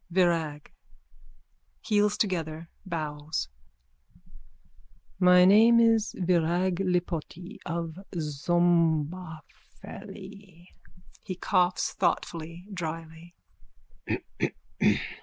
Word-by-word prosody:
_ - - -10
VIRAG: 165 -5 +1 1.1
(Heels 210 -1 +2
together, 165 -5 -2 0.2
bows.) 155 - -3 1.7
My 180 -1 +7
name 225 +5 +7
is 225 -3 +3
Virag 175 0 +1
Lipoti, 180 0 -3
of 165 0 -4
Szombathely. 175 +3 -2 0.5
_(He 185 -1 -6
coughs 180 -1 +1
thoughtfully, 170 +1 -2
drily.) 165 0 -6
175 Hz, 65 wpm, -28 LUFS, 160-185 Hz, 1.7 s, My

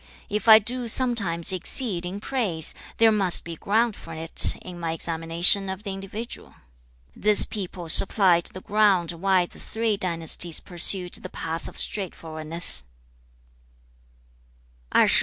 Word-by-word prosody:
If 210 +2 -4
I 220 -1 +9
do 240 +3 -4
sometimes 205 -8 +3
exceed 185 -1 -2
in 190 +3 -7
praise, 205 - -1 0.2
there 225 -1 +4
must 195 -5 +1
be 170 -1 -9
ground 220 +6 -1
for 165 - -11
it 160 +1 +2
in 180 -1 -11
my 165 -1 -4
examination 165 +4 +1
of 190 +2 -7
the 200 - -6
individual. 200 +4 -9 0.6
2. - - -19
'This 210 0 +7
people 180 -4 -8
supplied 180 0 +3
the 185 - -11
ground 200 -5 0
why 185 +1 0
the - - -17
three 225 -2 -3
dynasties 170 -2 +1
pursued 180 0 0
the - - -4
path 165 0 -7
of - - -11
straightforwardness.' 160 - 0
185 Hz, 135 wpm, -23 LUFS, 170-210 Hz, 0.6 s, I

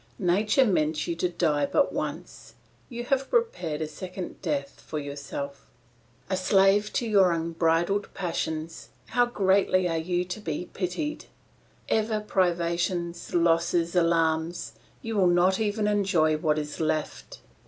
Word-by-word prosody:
Nature 205 +7 +3
meant 155 -7 +1
you 170 - -2
to 175 +2 0
die 155 -4 +1
but 285 - +2
once; - - -6 0.3
you 240 -2 -5
have 270 +2 0
prepared 185 - 0
a - - -3
second 180 +4 -7
death 140 -5 -3
for 155 - -5
yourself. 140 -1 -6 0.6
"A 190 - 0
slave 195 +2 +3
to 235 - -1
your 195 -4 +5
unbridled 165 +4 0
passions, 165 -3 -4 0.2
how 245 +1 +3
greatly 190 -4 +2
are 165 -1 -1
you 175 +2 -1
to 180 +4 -5
be 170 -3 -4
pitied! 200 - -3 0.6
Ever 220 0 +1
privations, 175 -3 -1
losses, 170 0 +2
alarms; 165 -4 +1 0.3
you 225 -1 -3
will 190 -3 +4
not 175 +2 +3
even 210 0 0
enjoy 190 -7 +2
what 155 0 +1
is 150 -1 -4
left. 155 -1 -3
175 Hz, 135 wpm, -27 LUFS, 160-200 Hz, 0.6 s, your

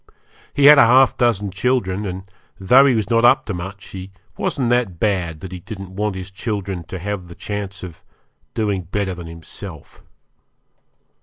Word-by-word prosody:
He 145 - +3
had 150 0 +10
half 125 +2 +6
a - - -36
dozen 105 -5 +1
children, 100 -2 0
and, 95 0 -5 0.4
though 125 +9 +6
he 130 - +3
was 110 -2 -1
not 115 0 +3
up 120 - +5
to 105 - -3
much, 95 +3 -7
he 95 0 -8 0.2
wasn't 125 -3 -1
that 115 -9 0
bad 90 -7 -1
that 95 - -8
he 90 - -6
didn't 95 -1 -9
want 105 0 -1
his 95 0 -7
children 100 -3 -4
to 95 - -6
have 95 0 -4
the 85 - -11
chance 100 -2 -5
of 85 -4 -9 0.5
being 105 -4 0
better 95 +2 -2
than 85 -2 -8
himself. 85 0 -10
100 Hz, 175 wpm, -20 LUFS, 90-110 Hz, 0.5 s, had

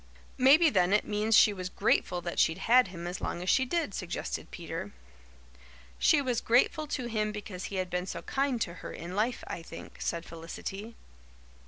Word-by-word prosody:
"Maybe, 300 +6 +6
then, 185 -1 +3
it 210 - +3
means 210 +1 +2
she 210 - +6
was 185 -2 -5
grateful 180 -1 +1
that 175 0 -4
she'd 160 - +3
had 250 0 +6
him 175 -2 -8
as 175 +1 -5
long 175 - -3
as 185 - +2
she 260 - +3
did," 320 -5 -1
suggested 180 -2 -4
Peter. - - -6 1.1
"She 290 -3 +4
was 250 -3 0
grateful 260 +6 +2
to 260 -3 -3
him 215 -2 -1
because 205 -3 -6
he 200 - -6
had 185 -1 -2
been 180 +1 -2
so 170 - -5
kind 270 -3 0
to 170 - -1
her - - -7
in 175 +2 -7
life, 230 +4 0
I 170 - -6
think," 165 - -11
said 170 0 -2
Felicity. 195 +6 -7
210 Hz, 190 wpm, -30 LUFS, 180-245 Hz, 1.1 s, Maybe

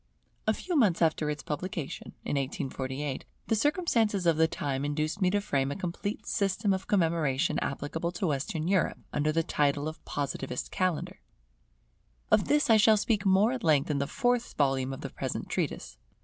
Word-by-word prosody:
A 215 - +4
few 360 - -3
months 210 - +4
after 160 -2 +2
its 150 0 -4
publication, 165 -1 -5
in - - -1
1848, 135 0 -3 0.2
the 225 - +1
circumstances 225 - +1
of 165 -2 +4
the 160 +1 +4
time 140 -4 -3
induced 155 +6 -1
me 185 - +4
to 205 +2 +2
frame 140 -8 0
a - - -3
complete 190 +3 -4
system 200 -1 +1
of 190 0 -4
commemoration 165 -6 +1
applicable 160 +5 -3
to 180 - -2
Western 155 +2 -1
Europe, 190 -1 +2 0.2
under 150 +1 +1
the 165 +1 +1
title 145 -1 +1
of 155 - -7
Positivist 140 -3 -4
Calendar. 185 -4 -1 1.1
Of - - +4
this 295 0 +3
I 225 -2 +6
shall 215 0 +6
speak 210 -1 +1
more 195 +4 +5
at 255 -2 -4
length 155 -3 +3
in 140 - 0
the 140 - -1
fourth 245 - 0
volume 135 -2 +1
of 135 - -6
the - - -6
present - - -4
treatise. - - -3
165 Hz, 175 wpm, -29 LUFS, 145-205 Hz, 1.1 s, I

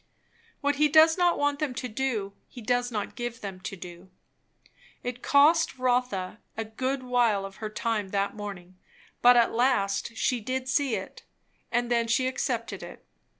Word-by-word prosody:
What 285 -1 +1
he 300 +1 +5
does 315 +2 +6
not 355 -1 +2
want 290 0 0
them 285 -5 -2
to 250 - -3
do, 220 -4 -2
he - - -12
does 245 +2 0
not 210 -3 -3
give 240 -2 -5
them 195 -2 -6
to 195 +1 -6
do. 180 0 -11 0.9
It 245 0 -5
cost 305 +2 +4
Rotha 245 -7 0 0.2
a 225 - -2
good 255 +4 -3
while 240 -5 +2
of 195 0 -10
her 215 - -5
time 215 -2 -2
that 200 +1 -1
morning, 185 -3 -8 0.4
but 245 0 +7
at 235 - +4
last 230 -3 +1
she 250 +1 +1
did 255 +3 -3
see 270 -3 +1
it, 190 -1 -7 0.5
and 240 0 0
then 235 -1 +2
she 230 +3 +2
accepted 245 -2 -2
it. - - -11
240 Hz, 170 wpm, -27 LUFS, 205-260 Hz, 0.9 s, but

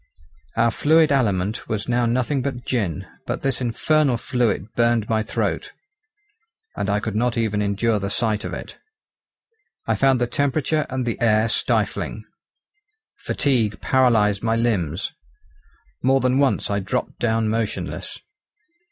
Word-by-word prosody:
Our 115 +1 +4
fluid 155 +4 +4
aliment 105 -6 0
was 110 -1 -2
now 120 0 +1
nothing 130 +3 0
but 125 -2 -4
gin; 100 - -1 0.2
but - - -3
this 135 -2 -1
infernal 130 +2 +2
fluid 115 -4 -1
burned 115 -2 +2
my 110 -1 +1
throat, - - -2 1.0
and 100 - -2
I 100 +1 +2
could 105 0 -4
not 120 +2 0
even 110 -2 0
endure 105 +2 +1
the 100 0 -3
sight 110 0 0
of - - -4
it. - - -8 1.1
I - - +1
found 135 -2 +3
the 120 - +2
temperature 145 +4 0
and 130 -1 -2
the 115 - -3
air 110 -1 +3
stifling. 115 - -1 0.9
Fatigue 115 -7 0
paralysed 110 -6 +3
my 115 0 +1
limbs. 95 -9 0 0.9
More 135 +1 +3
than 130 +1 +2
once 140 -6 +1
I 100 - +1
dropped 115 +6 -3
down 115 -1 +1
motionless. 110 0 -3
115 Hz, 140 wpm, -22 LUFS, 105-130 Hz, 1.1 s, Our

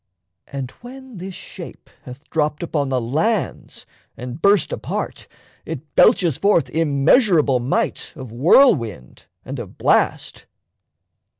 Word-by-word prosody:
And 135 -2 -6
when 260 -1 -11
this 185 +1 -7
shape - - -11 0.2
Hath 130 +4 -11
dropped 150 0 -1
upon 145 -5 -2
the 130 -1 0
lands 160 - -2 0.3
and 125 +5 -7
burst 200 -2 +3
apart, - - -5 0.4
It 155 -1 -8
belches 175 - +4
forth 200 -4 +2
immeasurable 155 - +3
might 125 +3 -2
Of 130 -4 -9
whirlwind 120 - +2 0.2
and - - -6
of - - -9
blast. - - 0
155 Hz, 115 wpm, -20 LUFS, 130-195 Hz, 0.4 s, belches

